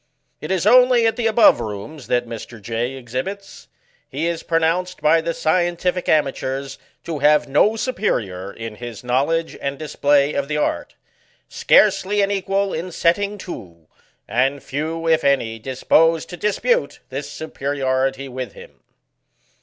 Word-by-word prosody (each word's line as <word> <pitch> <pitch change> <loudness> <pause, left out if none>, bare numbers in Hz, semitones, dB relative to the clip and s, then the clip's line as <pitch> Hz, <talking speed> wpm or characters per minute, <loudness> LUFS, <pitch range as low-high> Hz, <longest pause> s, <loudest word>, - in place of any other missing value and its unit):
It - - -7
is 190 -1 0
only 250 +1 +6
at 225 - +2
the 235 -2 0
above 225 - +5
rooms 115 +6 -7
that 120 0 +1
Mr. 115 0 -8
J. 115 +4 -3
exhibits. 130 +11 -6 0.4
He 145 +5 -3
is 170 -1 -2
pro 165 - 0
nounced 180 +3 -1
by 155 +2 +4
the 170 - -2
scientific 175 +2 0
amateurs, 135 -2 -1 0.2
to 160 -3 -4
have 150 +1 +4
no 150 +11 +3
su 255 +3 -2
perior 100 - -2
in 115 -2 -7
his 120 -1 -8
knowledge 140 +7 0
and 140 0 -3
display 145 -1 +1
of 140 -1 -1
the 150 0 -2
art 150 - -2
ŌĆö - - -32
scarcely 205 0 +3
an 200 - 0
equal 195 0 -1
in 175 +3 -4
setting 200 +5 +1
to 180 - -6
ŌĆö 85 - -10 0.4
and 130 +5 0
few, 160 +4 -3
if 160 -1 +3
any, 120 -5 +1
dis 130 +3 -7
posed 165 0 +3
to 180 - -6
dispute 210 - 0
this 140 +2 -5
superiority 135 -3 -2
with 125 -4 -6
him. - - -15
150 Hz, 160 wpm, -21 LUFS, 130-180 Hz, 0.4 s, only